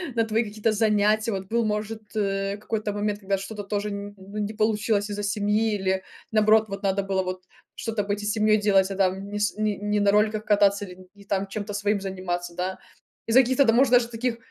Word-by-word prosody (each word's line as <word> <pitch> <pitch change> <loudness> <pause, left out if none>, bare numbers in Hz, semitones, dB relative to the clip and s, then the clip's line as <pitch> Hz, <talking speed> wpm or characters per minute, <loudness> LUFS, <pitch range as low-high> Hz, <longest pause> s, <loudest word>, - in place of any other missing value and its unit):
на 230 -1 +2
твои 220 +1 +1
какие-то 215 +1 -1
занятия? 215 +1 +2
Вот 190 -1 -4
был, 235 +3 +1
может, 215 +1 -2
э, 195 -1 -1
какой-то 210 0 -3
момент, 205 0 -2
когда 195 0 0
что-то 205 +2 -6
тоже 205 +1 -2
н 200 - -4
н 205 - -17
ну 195 +2 -10
не 210 +1 -2
получилось 215 -1 +1
из-за 205 0 -4
семьи 210 +1 +1
или, 190 -1 -1 0.3
наоборот, 215 0 +4
вот 195 +1 -7
надо 195 0 +1
было 195 -1 0
вот 185 0 -5 0.3
что-то 225 -3 -2
быть 205 +1 -2
и - - -4
с 210 - +1
семьей 215 -1 +3
делать, 200 -2 +3
а - - -3
там 195 +1 0
не 205 0 -4
с 205 0 0
не 215 -1 0
не 210 0 -1
на 200 0 +4
роликах 210 +1 +2
кататься 205 -1 +3
или 180 -1 -11 0.2
не 200 - -15
там 195 0 -1
чем-то 205 +1 -5
своим 205 0 0
заниматься, 180 -2 -4
да, 185 +2 -3 0.5
из-за 235 +3 +7
каких-то, 260 +2 +3
да, 225 - +4
может, 255 +1 +4
даже 240 -1 +5
таких, 230 +1 -2
205 Hz, 225 wpm, -25 LUFS, 195-215 Hz, 0.5 s, из-за